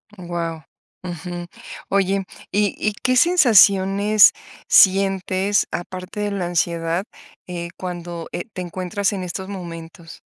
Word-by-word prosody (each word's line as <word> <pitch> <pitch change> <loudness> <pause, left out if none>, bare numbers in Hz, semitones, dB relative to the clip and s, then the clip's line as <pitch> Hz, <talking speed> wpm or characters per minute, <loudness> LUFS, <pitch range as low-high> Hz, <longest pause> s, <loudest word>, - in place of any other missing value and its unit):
Guau, 170 -3 -5 0.4
ujú, 175 0 -6 0.4
oye, 195 0 +1 0.3
¿y 205 0 +1
y 210 - -1
qué 255 0 +2
sensaciones 210 - +5 0.4
sientes, 195 +1 +3
aparte 185 +3 -6
de 205 0 -1
la 190 -3 -2
ansiedad, 170 0 -1 0.4
eh, 170 -1 -5
cuando, 175 -2 -6
eh, 175 - -4
te 185 - -5
encuentras 185 +3 -2
en 190 -2 -4
estos 190 +2 -6
momentos? 170 -3 -9
185 Hz, 115 wpm, -21 LUFS, 175-200 Hz, 0.4 s, sensaciones